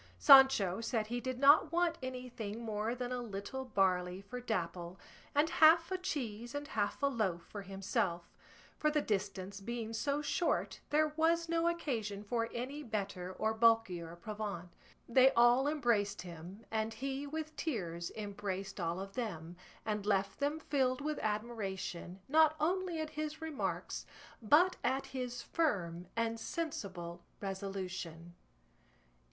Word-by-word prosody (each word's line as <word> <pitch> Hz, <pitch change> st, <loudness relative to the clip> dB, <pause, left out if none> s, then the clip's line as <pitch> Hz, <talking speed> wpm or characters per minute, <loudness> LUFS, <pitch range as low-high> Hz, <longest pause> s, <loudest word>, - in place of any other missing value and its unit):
Sancho 265 Hz, -9 st, +7 dB
said 225 Hz, -2 st, 0 dB
he 240 Hz, +3 st, -3 dB
did 255 Hz, 0 st, -3 dB
not 285 Hz, +3 st, +6 dB
want 340 Hz, -1 st, +1 dB
anything 250 Hz, -4 st, -5 dB
more 220 Hz, +1 st, -1 dB
than 250 Hz, 0 st, -4 dB
a 250 Hz, -1 st, -2 dB
little 235 Hz, +4 st, -5 dB
barley 185 Hz, -5 st, +1 dB
for 240 Hz, +6 st, -7 dB
Dapple, 175 Hz, -5 st, -3 dB, 0.4 s
and 295 Hz, +2 st, +4 dB
half 330 Hz, +2 st, +6 dB
a 375 Hz, -, +1 dB
cheese 245 Hz, -, -4 dB
and 290 Hz, 0 st, -4 dB
half 210 Hz, +4 st, -1 dB
a -, -, +6 dB
loaf 210 Hz, -11 st, 0 dB
for 205 Hz, -, -8 dB
himself; 190 Hz, -3 st, -1 dB, 0.6 s
for 305 Hz, -, +3 dB
the 300 Hz, 0 st, +2 dB
distance 195 Hz, -1 st, -2 dB
being 230 Hz, +1 st, -4 dB
so 280 Hz, +6 st, 0 dB
short 340 Hz, +4 st, 0 dB
there 305 Hz, +1 st, +3 dB
was 335 Hz, +1 st, +2 dB
no 335 Hz, 0 st, +1 dB
occasion 225 Hz, -12 st, -2 dB
for 230 Hz, +2 st, -1 dB
any 265 Hz, +5 st, -4 dB
better 200 Hz, -7 st, -3 dB
or 220 Hz, +3 st, 0 dB
bulkier 220 Hz, -7 st, +2 dB
provant. 200 Hz, -2 st, -5 dB, 0.4 s
They 255 Hz, +2 st, +6 dB
all 240 Hz, +3 st, +5 dB
embraced 235 Hz, -10 st, +1 dB
him, 175 Hz, +5 st, -10 dB
and 220 Hz, 0 st, -1 dB
he 275 Hz, +3 st, -3 dB
with 310 Hz, +1 st, -5 dB
tears 175 Hz, -, -3 dB
embraced 195 Hz, -2 st, -4 dB
all 170 Hz, +1 st, -1 dB
of 195 Hz, 0 st, -6 dB
them, 175 Hz, -9 st, -4 dB, 0.3 s
and 210 Hz, -2 st, -1 dB
left 195 Hz, -1 st, 0 dB
them 290 Hz, +3 st, 0 dB
filled 265 Hz, -4 st, +1 dB
with 300 Hz, 0 st, -2 dB
admiration 195 Hz, -4 st, -3 dB
not 310 Hz, +1 st, +5 dB
only 350 Hz, +1 st, 0 dB
at 310 Hz, -1 st, -3 dB
his 305 Hz, 0 st, -4 dB
remarks 320 Hz, -3 st, -3 dB, 0.3 s
but 305 Hz, -, +5 dB
at 270 Hz, +1 st, +1 dB
his 255 Hz, -2 st, -4 dB
firm 180 Hz, -, -1 dB
and 230 Hz, 0 st, 0 dB
sensible 185 Hz, -, -4 dB, 0.2 s
resolution. 190 Hz, -4 st, -5 dB
225 Hz, 145 wpm, -34 LUFS, 195-280 Hz, 0.6 s, Sancho